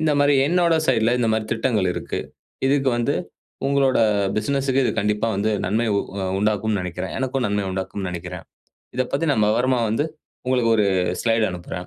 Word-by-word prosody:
இந்த 155 -1 +2
மாரி 145 0 +4
என்னோட 170 0 +3
சைட்ல 115 +2 +3
இந்த 115 -2 +1
மாரி 110 0 0
திட்டங்கள் 110 -5 +1
இருக்கு. - - -4 0.5
இதுக்கு 135 0 +2
வந்து 120 - +1 0.5
உங்களோட 135 -1 +2 0.4
பிசினஸ்க்கு 135 +4 +1
இது - - +2
கண்டிப்பா 105 +2 0
வந்து 105 +3 0 0.2
நன்மை 110 +4 +1
உ - - +3 0.2
அ - - -1
உண்டாக்கும்னு 105 0 0
நெனைக்கிறேன். 90 0 -5
எனக்கும் 130 0 -1
நன்மை 105 0 0
உண்டாக்கும்னு 95 0 -4
நெனைக்கிறேன். 90 -1 -6 0.5
இதப் 130 -1 -1
பத்தி 140 +4 0
நான் 105 -5 +2
விவரமா 125 +2 +2
வந்து 115 +7 0 0.4
உங்களுக்கு 125 -3 +2
ஒரு 105 - +3 0.4
ஸ்லைட் 115 -1 +2
அனுப்புறேன். 90 0 -6
115 Hz, 165 wpm, -22 LUFS, 105-135 Hz, 0.5 s, மாரி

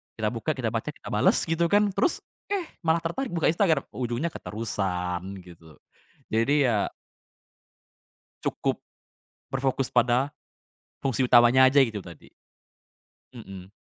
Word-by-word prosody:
kita - - -1
buka, - - -2
kita - - -2
baca, - - -3
kita - - -8
bales - - +3
gitu 165 +1 +1
kan, 205 +1 +3
terus, 355 - 0 0.2
eh, 400 -3 -1 0.2
malah 165 -1 +1
tertarik 205 +11 -2
buka 160 -1 +3
Instagram 165 -6 +2
ujungnya 125 +6 -2
keterusan, 90 -5 -3 0.2
gitu. 80 -4 -15 0.6
Jadi 135 +6 +3
ya 105 -4 +1 1.6
cukup - - -1 0.7
berfokus 135 0 -1
pada 125 +3 +2 0.7
fungsi 130 -1 +1
utamanya 120 +2 +6
aja 135 +1 +6
itu 110 -5 -1
tadi. 85 -4 -12 1.0
Mhm. 95 -5 -10
130 Hz, 120 wpm, -26 LUFS, 105-160 Hz, 1.6 s, utamanya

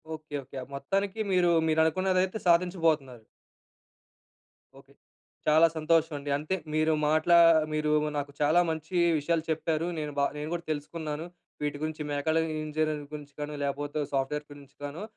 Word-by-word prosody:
Okay. 155 -1 -9
Okay. 135 - -11 0.2
మొత్తానికి 195 +9 -2
మీరు 180 -2 +4 0.2
మీరు 160 0 +3
అనుకున్నదైతే 185 +3 +1
సాధించబోతున్నారు. 165 - +2 1.6
ఓకే. - - -21 0.5
చాలా 155 +2 +6
సంతోషం 160 0 +2
అండి. 145 0 -6
అంతే 155 +6 -2 0.2
మీరు 155 +1 +2 0.2
మాట్లా 155 +3 +4 0.4
మీరు 155 0 0 0.3
నాకు 145 0 -3
చాలా 155 +4 +4
మంచి 160 +3 -6 0.2
విషయాలు 160 +2 0
చెప్పారు. 160 0 -1
నేను 150 -1 -3
బా 140 - +4
నేను 150 +1 -4
కూడా 170 0 -4
తెలుసుకున్నాను. 155 +1 -4 0.4
వీటి 145 -1 -2
గురించి 155 0 -3
మేకాల 145 +3 0 0.3
ఇంజనీరింగ్ 155 -1 -2
గురించి 145 -1 -8
కానీ 150 0 -4
లేకపోతే 145 +1 -2
సాఫ్ట్‌వేర్ 140 +2 -1
గురించి 140 -1 -14
కాను. 145 +6 -5
155 Hz, 140 wpm, -28 LUFS, 145-165 Hz, 1.6 s, చాలా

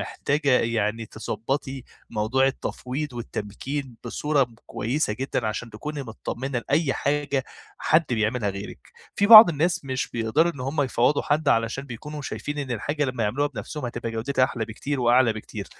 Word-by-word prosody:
محتاجة 145 0 -1
يعني 115 -1 -1
تضبّطي 130 +5 -4 0.3
موضوع 120 +5 +2
التفويض 135 +1 -3
والتمكين 120 +3 -5
بصورة 145 +3 +1 0.2
كويسة 120 0 -1
جدًا، 125 -1 -2
عشان 110 +2 -3
تكوني 145 +7 -5
متطمنة 125 +2 -4
لأي 145 -1 +2
حاجة 140 -2 0 0.3
حد 160 +1 +3
بيعملها 110 -1 0
غيرِك، 100 +1 -7 0.4
في 200 - +2
بعض 220 -2 +12
الناس 165 0 0
مش 130 -1 -2
بيقدروا 120 +9 +1
إن 135 - -10
هم 140 +3 0
يفوّضوا 130 +2 +2
حد، 150 0 +1
علشان 115 +4 +1
بيكونوا 145 +4 -7
شايفين 145 +2 -5
إن 135 -3 -4
الحاجة 145 +6 -1
لمّا 125 -3 -2
يعملوها 135 +8 +1
بنفسهم، 145 0 -6
هتبقى 120 -1 -4
جودتها 130 +3 +1
أحلى 115 -3 -3
بكتير 130 +5 -4
وأعلى 120 -1 +4
بكتير، 110 - -7
130 Hz, 150 wpm, -25 LUFS, 115-145 Hz, 0.4 s, بعض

